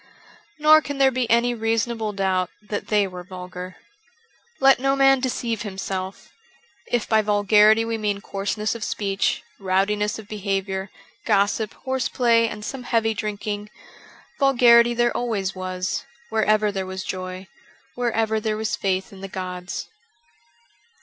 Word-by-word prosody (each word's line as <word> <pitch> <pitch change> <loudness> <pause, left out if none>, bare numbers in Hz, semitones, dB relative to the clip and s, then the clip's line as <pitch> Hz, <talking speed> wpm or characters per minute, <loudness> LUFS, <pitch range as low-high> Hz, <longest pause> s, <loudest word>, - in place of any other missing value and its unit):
Nor 310 +1 +6
can 285 -2 -5
there 270 -1 +5
be 250 -2 -1
any 235 +1 +3
reasonable 225 -1 -1
doubt 190 -2 0
that 210 0 -5
they 210 -1 +3
were 180 -2 -7
vulgar. 180 0 -8 0.8
Let 270 -1 +6
no 270 +1 +2
man 270 -1 +5
deceive 235 -3 -2
himself; 190 -2 -5 0.6
if 240 -3 -1
by 220 -1 +4
vulgarity 210 +1 +4
we 225 -1 -2
mean 205 -2 -1
coarseness 200 +2 -2
of 230 -2 -6
speech, 195 -2 -1 0.2
rowdi 195 +1 +1
ness 210 +2 -1
of 220 -2 -10
behaviour, 195 -2 -3 0.3
gossip, 210 +1 +1
horseplay, 240 -3 +2
and 210 -1 -7
some 270 - -5
heavy 225 -2 +1
drinking: 210 0 -4 0.7
vulgarity 240 -3 +5
there 240 0 +1
always 205 -6 -1
was, 185 0 -3 0.3
wherever 215 -1 +2
there 190 -1 -3
was 190 0 -5
joy, 185 0 -5 0.5
wherever 225 -2 0
there 215 -1 -2
was 220 0 -1
faith 190 0 -2
in 190 - -12
the 195 - -5
gods. 180 -1 -5
210 Hz, 140 wpm, -23 LUFS, 195-235 Hz, 0.8 s, Nor